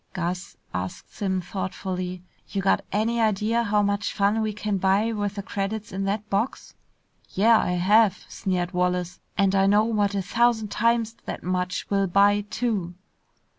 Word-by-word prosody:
"Gus," 180 0 -4 0.2
asked 90 +1 -5
Simms 190 -3 -2
thoughtfully, 185 -1 -4 0.3
"you 200 - -2
got 195 - +2
any 225 +3 +1
idea 220 +2 +2
how 210 -2 +2
much 200 0 -1
fun 205 +2 +2
we 215 -1 0
can 210 -1 -2
buy 195 +4 +2
with 205 -2 -2
the 200 - -4
credits 205 +2 -4
in 195 +1 -3
that 205 +2 -2
box?" 210 +6 -2 0.6
"Yeah, 225 +3 +5
I 180 - 0
have!" 205 +3 +3
sneered 180 -2 -2
Wallace, 180 -1 -1 0.2
"and 195 -1 +3
I 195 0 +4
know 205 +2 +5
what 205 -3 0
a 195 - 0
thousand 230 +1 +2
times 230 0 +1
that - - -5
much 180 0 -2
will 195 -1 +2
buy 200 +3 +4
too!" 200 -9 -2
200 Hz, 165 wpm, -25 LUFS, 185-215 Hz, 0.6 s, Yeah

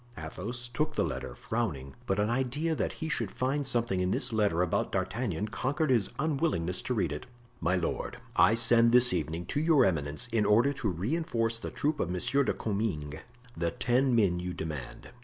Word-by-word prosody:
Athos 105 +10 -5
took 135 +6 -2
the - - +2
letter, - - -4
frowning, 75 - -3
but 95 +1 0
an 105 - +2
idea 130 +7 0
that - - -2
he 160 - -5
should 155 - -1
find 135 +2 -1
something 120 -7 +1
in 90 0 0
this 105 - +1
letter 100 -6 +2
about 90 - -1
D'Artagnan 105 +2 -2
conquered 145 +3 -1
his 115 -6 +2
unwillingness 140 - 0
to 125 - -2
read 90 -8 0
it. 75 - -6 0.3
"My 90 +2 +1
lord, 90 -2 -3 0.2
I 110 - +5
shall - - +1
send 115 0 +6
this 125 -3 +5
evening 85 0 -2
to 145 - -2
your 155 -4 +4
eminence 75 -3 0
in 115 -2 +1
order 115 +8 +4
to 120 -6 -2
reinforce 115 - -1
the - - -5
troop 150 +1 -1
of 85 - -1
Monsieur 115 +10 +1
de - - 0
Comminges, 90 -9 -3 0.4
the 85 0 -1
ten 125 +7 +1
men 95 -6 +2
you 90 0 -4
demand. 75 -6 -6
115 Hz, 195 wpm, -29 LUFS, 90-130 Hz, 0.4 s, send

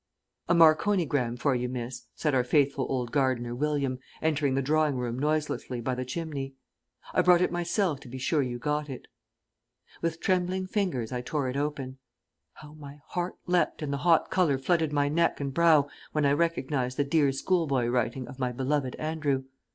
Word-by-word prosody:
"A 170 - +5
marconigram 155 - +3
for 140 +2 +1
you, 125 0 -1
miss," 125 0 -6
said 150 -3 0
our 130 -2 +3
faithful 140 0 +2
old 125 -3 -2
gardener, 130 -4 0
William, 140 -1 -1 0.2
entering 150 -4 +1
the 135 - +1
drawing 155 0 +2
room 125 -1 -3
noiselessly 150 -4 -1
by 125 +2 -2
the 125 0 -3
chimney. 135 -1 -5 0.6
"I - - +4
brought 180 0 +5
it - - +1
myself 175 -2 0
to - - -13
be 130 +2 -7
sure 145 +4 +1
you 125 -2 -3
got 150 +3 -2
it." 130 - -7 1.0
With 165 -1 -2
trembling 185 +1 0
fingers 180 - -1
I 125 -1 -2
tore 135 +1 -2
it 125 - -4
open. 140 -2 -3 0.5
How 150 -1 -13
my 145 -2 -11
heart 175 0 -3
leapt 175 -2 +1
and 140 -1 -2
the - - -1
hot 165 +3 +3
colour 170 -7 +2
flooded 160 +2 +1
my 145 -1 +2
neck 165 +3 +1
and 140 -1 -3
brow 160 -2 +5 0.3
when 150 -1 +1
I 140 - +4
recognised 145 -5 0
the 145 - +3
dear 140 -1 +2
schoolboy 140 -3 +1
writing 120 +1 -1
of 130 - -11
my 125 -1 0
beloved 130 +1 -1
Andrew! 155 -4 -1
145 Hz, 180 wpm, -28 LUFS, 130-160 Hz, 1.0 s, A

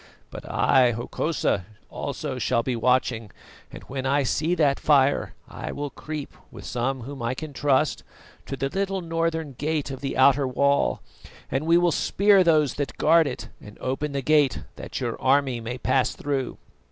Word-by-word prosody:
But - - -9
I, 125 -2 +4
Hokosa, 120 - -1 0.3
also - - -4
shall 115 - +1
be 125 0 -1
watching, 120 -2 +1 0.4
and - - -10
when 135 0 -4
I 140 +1 +2
see 155 +7 0
that 145 -5 +2
fire 140 -2 +2
I - - -6
will 145 -1 -4
creep, 150 -2 -7 0.2
with - - -11
some 130 +2 -2
whom 135 +2 -8
I 120 +2 -1
can 155 +1 -7
trust, 145 +1 +1 0.5
to 135 - -4
the 135 - -1
little 195 +2 -2
northern 165 -3 -2
gate 150 -1 -1
of 135 - -7
the 135 - -3
outer 135 +1 +5
wall, 140 +2 +1 0.5
and 140 +4 -1
we 170 +1 +6
will 175 0 +3
spear 200 +3 +4
those 155 -6 +3
that 140 - -4
guard 165 0 +4
it - - -6
and 105 0 -13
open 135 +3 -2
the 140 -1 -2
gate, 150 -2 +3
that - - -6
your - - -3
army 130 -1 +2
may 120 +2 -5
pass 130 0 +1
through. 140 -3 -3
140 Hz, 175 wpm, -25 LUFS, 130-155 Hz, 0.5 s, we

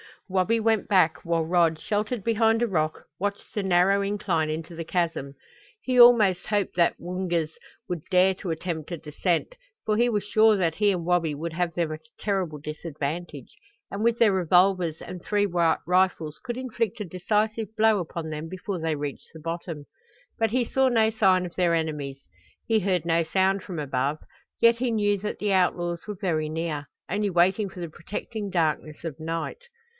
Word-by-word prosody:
Wabi 195 +4 +1
went 220 -2 +1
back, 180 -5 +3
while 170 -1 +1
Rod, 165 -1 +3
sheltered 210 +4 -2
behind 225 +1 +2
a - - +2
rock, 155 -6 -1 0.2
watched 200 +1 -4
the 210 - -1
narrow 190 +1 +3
incline 200 -6 0
into 160 +2 -4
the 165 0 -5
chasm. 165 -6 -2 0.5
He 255 -1 +1
almost 225 -7 +6
hoped 205 -4 0
the 170 -1 +3
Woongas 175 -3 -2 0.4
would 175 -3 -3
dare 185 0 +4
to 185 -1 -6
attempt 160 -1 -4
a 170 - -3
descent, 165 - -2 0.3
for 215 -1 +1
he 240 +2 +4
was 210 -3 0
sure 215 +1 +4
that 170 -5 0
he 205 -1 +3
and 175 -3 -2
Wabi 170 -4 +1
would 165 +3 -4
have 170 0 -1
them 170 -3 0
at 155 - -5
a 235 - -28
terrible 190 -7 -1
disadvantage 155 - -6 0.3
and 200 +2 -3
with 235 0 +3
their 225 -3 +5
revolvers 180 -2 +2
and 180 -1 -8
three 205 +2 +1
rifles 175 -2 +1
could 240 -1 -5
inflict 230 -3 -2
a - - -2
decisive 210 +5 -1
blow 220 -1 +4
upon 165 -2 -5
them 155 +1 -5
before 185 +2 -5
they 160 -1 -1
reached 145 -1 -5
the 160 - -10
bottom. 165 -2 -5 0.5
But 225 -2 +2
he 250 +1 +2
saw 265 +3 +2
no 225 -3 +3
sign 190 -4 +3
of 175 - -8
their 175 -2 +2
enemies. 150 -4 -3 0.4
He 225 -1 +2
heard 180 -4 0
no 165 0 +2
sound 190 +3 +1
from 180 -4 -7
above, 140 0 -1 0.4
yet 230 0 +6
he 245 0 0
knew 205 -2 +1
that 210 +2 -4
the 205 -1 0
outlaws 175 -1 0
were 210 -2 -5
very 155 -5 0
near 155 -2 -3 0.2
only 210 0 0
waiting 190 +3 +2
for 180 - -9
the 170 - -4
protecting 205 +5 -6
darkness 155 -3 -1
of 160 -3 -5
night. 165 - -4
180 Hz, 185 wpm, -26 LUFS, 165-210 Hz, 0.5 s, almost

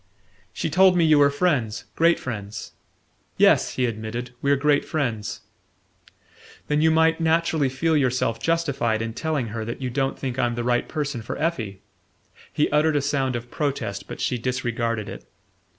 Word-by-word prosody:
"She - - -3
told 185 +2 +5
me 170 - +4
you 155 -2 +5
were 140 0 +6
friends 140 -8 0
great 165 +1 +4
friends" 105 -4 -6 0.7
"Yes," - - +4
he 130 - +1
admitted, 115 +2 -4
"we're 140 0 +3
great 145 +1 +2
friends." 115 -9 -3 1.2
"Then 150 0 +1
you 160 - +5
might 160 +1 +3
naturally 160 -3 +2
feel 160 +5 0
yourself 125 -4 +1
justified 140 -8 0
in 115 0 -4
telling 145 -3 -2
her 110 +1 -4
that 115 +2 -5
you 130 -2 -3
don't 135 +1 -1
think 130 -2 -4
I'm 120 -1 +1
the 120 - -2
right 120 0 0
person 145 -5 -3
for 110 - -5
Effie." 110 - -2 0.7
He 150 - +1
uttered 150 +1 +3
a 145 - +2
sound 135 -3 0
of 120 +1 -6
protest, 135 -9 -3
but - - -8
she 125 - -1
disregarded 115 -3 -2
it. - - -8
130 Hz, 165 wpm, -24 LUFS, 115-155 Hz, 1.2 s, were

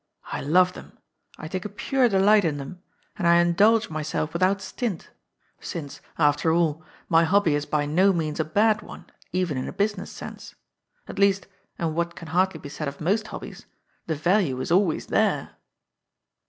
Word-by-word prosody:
I - - -3
love 180 +5 +3
them; - - -13 0.4
I 155 - -7
take 185 +2 -4
a 210 - -5
pure 250 +5 +1
delight 205 +1 +4
in 155 -4 0
them; 145 +6 -8 0.4
and 185 -5 0
I 170 - +6
indulge 200 +6 +4
my 155 0 -3
self 155 +1 -3
without 185 +3 +2
stint, 200 -2 -4 0.5
since, 145 -5 -7 0.2
after 150 +1 +3
all, 160 -2 +1 0.2
my 165 -1 +4
hobby 180 -1 +3
is 145 0 -1
by 150 -1 0
no 180 +7 +3
means 160 -4 -2
a - - +3
bad 210 +7 +2
one - - -11 0.3
even 175 -6 -1
in - - -4
a - - -4
business 205 +1 -2
sense. - - -10 0.5
At - - -7
least, 200 -1 +3 0.3
and 165 -2 -2
what 170 +1 -2
can 165 - -10
hardly 180 0 +1
be 145 - -9
said 150 +1 -5
of 140 0 -6
most 205 +7 0
hobbies, - - -9 0.4
the 160 - -1
value 170 -4 +1
is 130 - -4
always 180 -2 +2
there." - - 0
170 Hz, 180 wpm, -25 LUFS, 155-200 Hz, 0.5 s, I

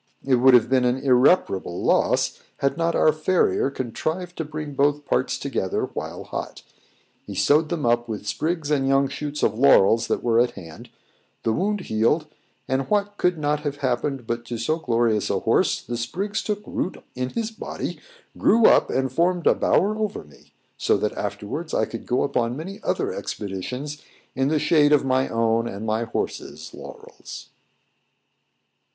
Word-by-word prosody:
It 130 -2 +3
would 130 +1 +6
have 120 - +5
been 130 0 +2
an 125 +1 +2
irreparable 125 - +2
loss, - - +1 0.2
had 140 - 0
not 165 0 0
our 155 - +4
farrier 155 -3 +1
contrived 155 +8 -4
to 160 - -2
bring 150 -1 -6
both 145 +1 +1
parts 130 - 0
together 135 -9 -2
while - - -5
hot. - - -6 0.6
He - - -6
sewed 150 +10 +3
them 165 -6 -2
up 120 0 +2
with 105 -2 -5
sprigs 155 - -2
and 135 -2 +2
young 135 0 +3
shoots 150 +1 -5
of 110 +2 +1
laurels 115 -4 +5
that - - -1
were 115 -1 +3
at 120 0 +2
hand; 80 -3 -11 0.5
the 110 - +1
wound 205 - 0
healed, 115 +6 +1 0.4
and, 130 0 -1
what 205 0 0
could 180 -1 +1
not 150 0 0
have 145 -1 -3
happened 130 +1 -1
but 120 +1 -3
to 120 0 -5
so 135 +8 0
glorious 115 -7 +1
a - - +1
horse, - - +2
the 120 0 -4
sprigs 195 - -3
took 210 -1 -3
root 185 - -3 0.2
in 125 0 -3
his 225 - -3
body, 220 - -6 0.4
grew 230 0 +4
up, - - +5
and 130 -1 0
formed 175 +3 +1
a - - +6
bower 205 +3 +2
over 215 -2 -3
me; 75 -1 -21 0.3
so - - +2
that - - -1
afterwards - - -4
I - - +2
could - - -8
go 125 - +1
upon 125 -3 -1
many 190 +6 -7
other - - -1
expeditions 125 +10 -5 0.3
in 135 +1 0
the 155 +2 +2
shade 150 -1 +4
of 145 -2 +3
my 130 0 +1
own 115 0 +1
and 100 0 -6
my 110 +1 0
horse's 115 - -5
laurels. - - -11
135 Hz, 175 wpm, -23 LUFS, 120-160 Hz, 0.6 s, would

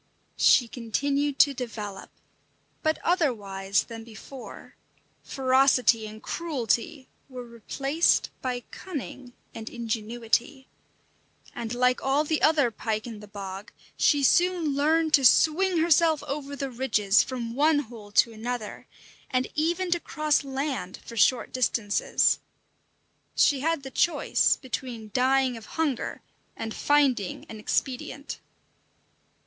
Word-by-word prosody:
She 245 - +5
continued 275 +5 -1
to 285 - +4
develop, 215 -6 -6 0.7
but 315 0 +1
otherwise 200 - 0
than 225 -1 -9
before; 235 +3 -11 0.5
ferocity 260 -4 +3
and 215 +1 -11
cruelty 280 -2 -2 0.2
were 250 -2 -8
replaced 270 +7 0
by 250 -1 -2
cunning 270 -7 -7 0.2
and 225 0 -7
ingenuity. 235 +3 -2 0.9
And 235 0 -5
like 250 +1 +2
all 275 +3 +2
the 310 0 -1
other 295 -6 +3
pike 215 -1 -3
in 225 -3 -8
the 210 - -12
bog, 195 0 -8 0.2
she 285 -1 +3
soon 350 0 +3
learned 315 +2 +2
to 275 - +6
swing 335 +8 +4
herself 325 -1 +3
over 280 0 -5
the 275 -1 -4
ridges 215 -5 +2
from 240 -3 -4
one 300 +4 +3
hole 225 -7 -6
to 230 +2 +4
another, 225 -1 -5 0.4
and 255 0 0
even 345 +4 0
to 345 - +2
cross 305 -3 0
land 265 -9 -4
for 230 - -9
short 240 +3 +2
distances. 230 -4 +1 1.0
She 280 - +4
had 320 0 -1
the 265 - -8
choice 345 - +2
between 240 -4 -6
dying 260 0 +2
of 220 - -12
hunger 295 -6 -2 0.3
and 225 -1 -5
finding 270 -10 +1
an 220 - -10
expedient. 265 +5 -3
255 Hz, 120 wpm, -26 LUFS, 225-290 Hz, 1.0 s, to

